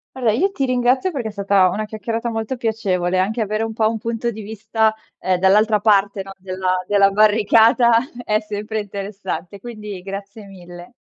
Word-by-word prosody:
Allora, 240 -4 +1
io 385 - +1
ti 275 -8 -1
ringrazio 255 +7 +1
perché 245 -7 -3
è - - -8
stata 200 -2 +3
una 215 +4 -3
chiacchierata 225 +2 -4
molto 225 +3 -3
piacevole, 190 -6 -1
anche 215 +5 0
avere 215 +1 -1
un 225 0 -3
po' 220 -1 +2
un 225 - -3
punto 230 +1 -3
di 220 -1 -6
vista, 220 +1 0 0.2
ehm, 185 -1 0
dall'altra 210 +3 +4
parte, 200 -2 +2
no, 195 0 -9
della 185 0 -2
della 200 -1 +4
barricata 225 +3 +4 0.3
è 215 0 +1
sempre 215 0 -4
interessante, 200 -1 -6
quindi 210 -4 -8
grazie 200 +2 -8
mille. 175 +1 -12
215 Hz, 175 wpm, -20 LUFS, 195-225 Hz, 0.3 s, dall'altra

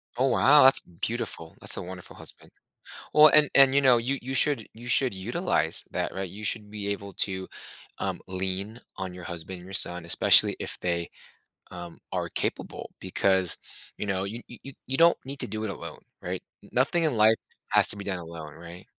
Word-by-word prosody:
Oh, 130 +2 +1
wow, 140 +4 +5
that's 135 +1 +7
beautiful, 90 -2 -5
that's - - +3
a - - -4
wonderful 90 0 -9
husband. - - -5 0.6
Well, 150 +1 +8
and 150 0 +4
and, 135 -1 +6
you 140 - +4
know, 130 -3 +5
you 125 +4 -2
you 130 +2 -6
should 135 -5 +1
you 120 +2 -12
should 130 -1 +1
utilize 110 - -1
that, - - -3
right? 95 0 -4
You 105 +4 -10
should 105 -1 -2
be 105 -1 -5
able 100 -1 -5
to, 95 -1 -6 0.5
um, - - -3
lean 95 +4 -4 0.2
on 95 -1 -5
your 90 -1 -10
husband 85 +2 -7
and 90 - -13
your 95 - -11
son, 90 -3 +6
especially 85 - +5
if - - -5
they, 85 -1 -3 0.6
um, 85 -1 -10
are - - -2
capable - - -4
because, 95 -1 0 0.4
you - - -4
know, 95 -1 -2
you 110 +4 -7
you 135 +3 -11
you 135 - -1
don't 170 +2 +5
need 140 +1 -6
to 125 - +1
do 110 -1 -5
it 110 - -3
alone, 95 - -8 0.2
right? - - -5 0.2
N - - -17
nothing 170 -1 +1
in 150 - 0
life 110 +1 +5 0.3
has - - +5
to - - -2
be 100 - -8
done 95 -2 -4
alone, 80 -3 -9
right? 85 +3 -12
100 Hz, 200 wpm, -26 LUFS, 90-125 Hz, 0.6 s, Well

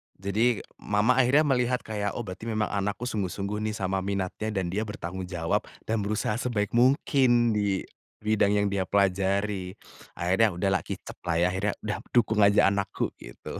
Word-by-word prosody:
Jadi, 105 +4 0 0.2
mama 105 +4 +2
akhirnya 135 +4 +5
melihat 125 -3 +1
kayak, 105 -2 -3
"Oh 120 - -3
berarti 95 +2 -8
memang 110 -2 -1
anakku 100 +3 -2
sungguh-sungguh 100 -2 -2
nih 105 - -3
sama 95 -1 -1
minatnya. 100 +2 -3
Dan 95 -5 -2
dia 105 +4 -2
bertanggung 95 -3 -5
jawab, 85 -2 -1 0.2
dan 110 0 -1
berusaha 105 +2 -1
sebaik 110 -5 -1
mungkin 125 -1 +3
di 100 -3 0 0.4
bidang 105 -1 +2
yang 100 0 +2
dia 95 -1 -1
pelajari." 100 0 0 0.4
akhirnya 95 +4 +2
udahlah 95 +1 +1
kicep - - -7
lah 85 - +1
ya, 85 - +3
akhirnya 100 +3 -1
udah, 105 -3 -2 0.2
"dukung 110 -2 +3
aja 100 -1 +5
anakku" 100 -1 -2
gitu. - - -9
105 Hz, 165 wpm, -27 LUFS, 95-110 Hz, 0.4 s, akhirnya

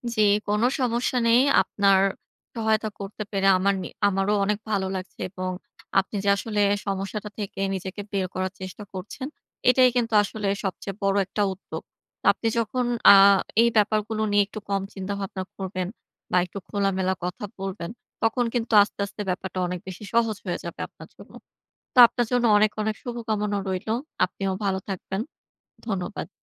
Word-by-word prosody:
জি, 215 - +2 0.3
কোন 210 +1 +1 0.2
সমস্যা 245 0 0
নেই। 230 +1 +6 0.2
আপনার 195 0 +3 0.6
সহায়তা 220 -1 +1
করতে 200 +2 -5
পেরে 195 -1 +1
আমার 195 +2 +2
নি - - -4 0.2
আমারও 195 +1 +1
অনেক 205 +1 +1
ভালো 195 -2 +1
লাগছে। 185 0 -7
এবং 185 0 -4 0.5
আপনি 195 +2 -4
যে, - - +4
আসলে 210 0 -2 0.3
সমস্যাটা 195 +2 -3
থেকে 195 -1 -4
নিজেকে 190 +2 -5
বের 195 -2 0
করার 185 0 -2
চেষ্টা 185 +3 -7
করছেন, 200 +8 -6 0.4
এটাই 255 0 +6
কিন্তু 235 -2 0
আসলে 205 0 -4 0.2
সবচেয়ে 195 0 -4
বড় 195 0 +2
একটা 200 +2 -3
উদ্যোগ। 190 - -8 0.5
আপনি 225 - -3
যখন 245 +2 0 0.3
আহ 195 0 +8 0.2
এই 235 - +5
ব্যাপারগুলো 215 +1 +1
নিয়ে 205 0 +5
একটু 215 - -7
কম 200 -1 +1
চিন্তাভাবনা 195 0 -4
করবেন, 185 -1 -3 0.4
বা 180 - +3
একটু 180 - -10
খোলামেলা 190 -2 +1
কথা 180 +3 -4 0.2
বলবেন, 190 -3 -4 0.3
তখন 240 +2 +2
কিন্তু 230 -2 -1
আস্তে, 205 - -10
আস্তে 200 +1 -8
ব্যাপারটা 185 0 -3
অনেক 180 0 -4
বেশি 190 +2 -8
সহজ 230 -2 +2
হয়ে - - -1
যাবে - - -7
আপনার - - -14
জন্য। - - -15 0.6
তো - - -1
আপনার 240 0 -1
জন্য 245 -1 +2
অনেক, 210 +1 +4
অনেক 215 0 -1
শুভকামনা 220 -4 -2
রইলো। 190 +3 -2 0.3
আপনিও 190 +1 -3
ভালো 190 -1 +1
থাকবেন। 190 0 -4 0.7
ধন্যবাদ। 195 -1 -3
200 Hz, 160 wpm, -25 LUFS, 190-220 Hz, 0.7 s, আহ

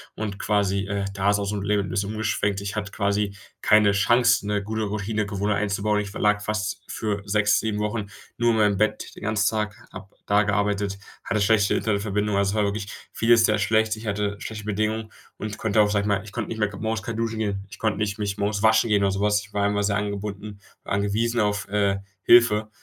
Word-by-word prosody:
und 105 -2 -4
quasi, 100 -2 +1
äh, 100 -1 -2
da 100 0 +1
ist 105 - +1
aus 100 0 -2
'm 105 -1 -3
Leben 100 -1 0
'n - - -7
bisschen 100 +3 -1
umgeschwenkt. 105 -2 -1
Ich 100 +1 -5
hatte 105 -1 -3
quasi 100 0 0 0.3
keine 105 -1 +5
Chance, 115 +2 +3
'ne 105 -1 0
gute 110 +1 -3
Routinegewohnheit 105 -1 -1
einzubauen. 105 +1 0
Ich 100 -1 -4
verlag 105 0 +1
fast 105 -1 -2
für 105 -2 -3
6, 105 +1 +3
7 105 -1 -2
Wochen 105 -1 -2 0.3
nur 120 0 +3
in 110 - +1
meinem 105 -2 +3
Bett 110 +1 -1
den - - -11
ganzen 105 -1 +2
Tag, 105 -1 -2 0.2
habe 95 +1 -9 0.2
da 105 +1 +4
gearbeitet, 100 -1 0 0.3
hatte 110 -3 0
schlechte 100 -1 +3
Internetverbindung. 105 -1 0
Also, 100 0 +2
es - - -3
war 105 - +2
wirklich 100 0 -2 0.2
vieles 115 0 +4
sehr 105 -1 +2
schlecht. 110 +1 +2
Ich 110 - -9
hatte 100 0 -1
schlechte 105 -1 -6
Bedingungen 110 +1 -2 0.3
und 105 0 -5
konnte 110 -1 +2
auch 105 - +3
sage 100 -1 +1
ich 105 - -2
mal, 100 0 +1
ich 105 - -11
konnte 120 0 -4
nicht 110 - -5
mehr 105 -1 +1
morgens 110 0 -2
kein 115 -1 -4
Duschen 115 -1 -2
gehen. 100 -2 -2
Ich - - -12
konnte 110 -3 0
nicht 105 -1 -2
mich 100 -2 -3
morgens 100 +1 -1
waschen 110 +1 +4
gehen 100 -1 +3
oder 100 - +2
so 95 - -3
was. 105 0 +2
Ich 100 0 -15
war 100 -1 0
einfach 105 0 +1
sehr 100 0 +1
angebunden, 100 0 -5 0.2
angewiesen 105 +4 0
auf, 105 -1 0
äh, 100 -1 +1 0.2
Hilfe, 110 -3 +5
105 Hz, 220 wpm, -24 LUFS, 100-110 Hz, 0.3 s, keine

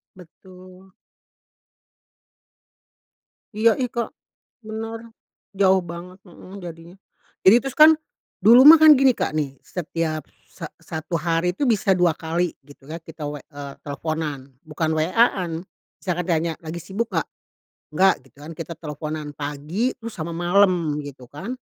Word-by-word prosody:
Betul. 185 +1 -16 2.6
iya 225 +2 +4
ih 255 - 0
Kak 235 -1 -3 0.5
benar, 220 +1 -6 0.6
jauh 190 -1 +3
banget 175 +2 -9
mhm, 185 +2 -12
jadinya. 170 +1 -10 0.5
Jadi 190 +5 +8
terus 270 -1 -5
kan, 310 +1 +10 0.5
dulu 235 +5 +8
mah 320 +1 +11
kan 310 -1 +10
gini 270 -1 +5
Kak 155 - -2
nih, 140 -3 -3
setiap 165 -3 -3 0.2
sa - - -9
satu 160 +2 -4
hari 165 +2 0
itu 275 +7 0
bisa 200 -4 +2
2 180 -3 +2
kali 170 +2 -2
gitu 140 -1 -18
kan, 160 +2 -6
kita 160 -2 -8
w 145 - -5
eee, - - -51 0.3
kita - - -39
teleponan 145 -2 -4
bukan 155 0 -2
WA-an, 185 +2 +2 0.5
saya 180 -2 -2
kan - - -9
tanya 165 -1 0
"Lagi 165 +1 -6
sibuk 200 +7 -4
nggak?" - - 0 0.7
"Nggak," 190 0 +5
gitu - - -35
kan, 155 - -9
kita 165 0 -6
teleponan 155 -1 -6
pagi 150 - -2
terus 230 -1 -8
sama 170 +1 -5
malem, 175 -3 +2
gitu 140 -3 -10
kan, 190 - -6
175 Hz, 145 wpm, -22 LUFS, 155-195 Hz, 2.6 s, mah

